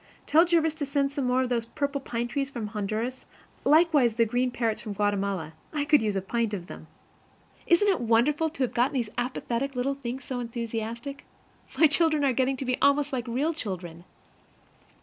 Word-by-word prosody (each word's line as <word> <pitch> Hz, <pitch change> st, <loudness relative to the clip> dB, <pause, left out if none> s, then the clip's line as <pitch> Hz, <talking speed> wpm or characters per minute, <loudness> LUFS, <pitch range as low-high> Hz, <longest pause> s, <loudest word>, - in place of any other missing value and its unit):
Tell 325 Hz, +3 st, +5 dB
Jervis 330 Hz, -2 st, +2 dB
to -, -, +1 dB
send 280 Hz, 0 st, +1 dB
us -, -, -14 dB
some 275 Hz, -3 st, -1 dB
more 255 Hz, +1 st, +2 dB
of 255 Hz, -, -3 dB
those 235 Hz, -2 st, 0 dB
purple 280 Hz, +3 st, -2 dB
pine 240 Hz, -2 st, -3 dB
trees 275 Hz, +3 st, -2 dB
from 235 Hz, -6 st, -5 dB
Honduras; 220 Hz, +4 st, -3 dB, 0.4 s
likewise 295 Hz, -6 st, +4 dB
some 230 Hz, -1 st, +3 dB
green 245 Hz, +3 st, 0 dB
parrots 230 Hz, -3 st, -1 dB
from 210 Hz, -, -5 dB
Guatemala. 200 Hz, -5 st, -1 dB, 0.2 s
I 295 Hz, -2 st, -1 dB
could 295 Hz, -1 st, +5 dB
use 210 Hz, -2 st, -1 dB
a 190 Hz, -, -1 dB
pint 225 Hz, +1 st, -1 dB
of 175 Hz, -3 st, -7 dB
them! -, -, -11 dB, 0.8 s
Isn't 345 Hz, +4 st, +4 dB
it 385 Hz, -8 st, +2 dB
wonderful 250 Hz, +8 st, +2 dB
to 300 Hz, -4 st, -3 dB
have 250 Hz, -, -1 dB
got 245 Hz, +4 st, +2 dB
these 235 Hz, -5 st, -1 dB
apathetic 255 Hz, +1 st, -2 dB
little 255 Hz, +3 st, 0 dB
things 265 Hz, -1 st, -6 dB
so 255 Hz, -2 st, -3 dB
enthusiastic? 235 Hz, +2 st, -5 dB, 0.5 s
My 325 Hz, -, +7 dB
children 310 Hz, -1 st, +3 dB
are 265 Hz, -, +3 dB
getting 265 Hz, +2 st, +1 dB
to 265 Hz, -, -4 dB
be 250 Hz, 0 st, -1 dB
almost 280 Hz, 0 st, +3 dB
like 250 Hz, -2 st, -2 dB
real 275 Hz, +8 st, 0 dB
children. 180 Hz, -, -6 dB
250 Hz, 195 wpm, -27 LUFS, 230-280 Hz, 0.8 s, My